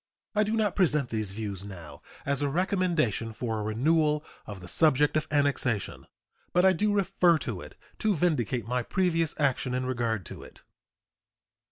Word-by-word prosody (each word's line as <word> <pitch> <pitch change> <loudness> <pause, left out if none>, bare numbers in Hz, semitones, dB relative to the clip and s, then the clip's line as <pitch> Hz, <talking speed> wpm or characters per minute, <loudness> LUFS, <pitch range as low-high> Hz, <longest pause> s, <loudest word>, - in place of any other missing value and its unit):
I 210 - +2
do 215 +2 -1
not 215 -2 +1
present 150 -8 +2
these 110 -3 -2
views 100 -2 -5
now 85 -8 -10 0.2
as 140 +1 0
a 145 - +1
recommendation 165 - 0
for 115 -1 -3
a - - -3
renewal 150 +7 +1 0.2
of 100 -2 -7
the 90 - -11
subject 150 - +3
of 155 0 0
annexation, 140 -7 0 0.5
but 180 +1 +4
I 190 - +6
do 210 +4 +1
refer 190 -4 +3
to - - -5
it - - -12 0.2
to 215 -3 +2
vindicate 130 - 0
my 125 +1 0
previous 165 +2 0
action 130 -3 0
in 130 0 -1
regard 115 -6 -1
to - - -9
it. - - -15
145 Hz, 170 wpm, -28 LUFS, 115-175 Hz, 0.5 s, I